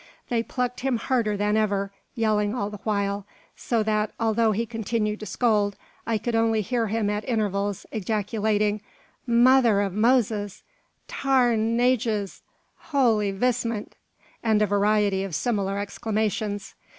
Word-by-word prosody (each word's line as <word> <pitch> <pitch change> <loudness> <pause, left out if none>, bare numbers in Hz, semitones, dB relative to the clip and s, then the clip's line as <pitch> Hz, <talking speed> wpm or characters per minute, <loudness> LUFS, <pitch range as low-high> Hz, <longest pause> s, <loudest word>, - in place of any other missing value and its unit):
They 235 -2 +1
plucked 250 +1 -3
him 260 -2 0
harder 225 -4 0
than 210 +1 +1
ever, 200 -2 0 0.2
yelling 215 -2 +1
all 205 -4 -2
the 210 - -8
while; 200 -1 -1 0.3
so 230 -3 0
that, 215 0 0
although 225 0 +2
he 225 +3 -1
continued 225 -1 -2
to 215 - -7
scold, 210 -4 +1 0.3
I 230 -1 +1
could 235 +3 -3
only 225 -1 +2
hear 230 +2 -1
him 215 0 0
at 210 +1 -2
intervals 205 -3 -1
ejaculating: 210 0 0 0.5
"Mother 240 -2 +5
av 195 -2 -3
Moses!" 215 -2 +1 0.4
"Tare 265 -3 +2
an 225 +1 +1
ages!" 230 -5 0 0.4
"Holy 230 -8 +1
vistment!" 230 +1 -1 0.5
and 220 -2 +2
a - - +4
variety 205 -1 +2
of 190 -5 -4
similar 200 0 -1
exclamations. 205 0 -2
215 Hz, 140 wpm, -25 LUFS, 205-230 Hz, 0.5 s, Mother